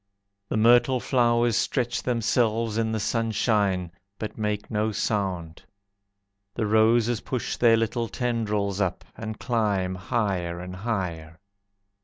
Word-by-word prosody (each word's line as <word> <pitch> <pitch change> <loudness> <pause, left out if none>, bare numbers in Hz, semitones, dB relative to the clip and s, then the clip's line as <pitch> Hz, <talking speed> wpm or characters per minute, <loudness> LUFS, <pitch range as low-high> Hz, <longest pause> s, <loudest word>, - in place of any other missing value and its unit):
The - - -1
myrtle 120 +3 +5
flowers 120 -2 +2
stretch 120 0 0
themselves 115 -2 +1
in 110 0 0
the 110 - -1
sunshine, 105 -5 0 0.3
But 110 - -5
make 105 -1 -3
no 110 0 0
sound. 95 -6 -2 0.9
The 115 - -1
roses 110 +2 +3
push 125 -3 -3
their 115 -2 +5
little 115 +1 -1
tendrils 105 -4 -1
up, 90 -2 -2
And 110 -1 -6
climb 105 -6 0
higher 90 -3 -2
and 90 +1 -7
higher. 90 -7 -4
110 Hz, 120 wpm, -25 LUFS, 100-115 Hz, 0.9 s, myrtle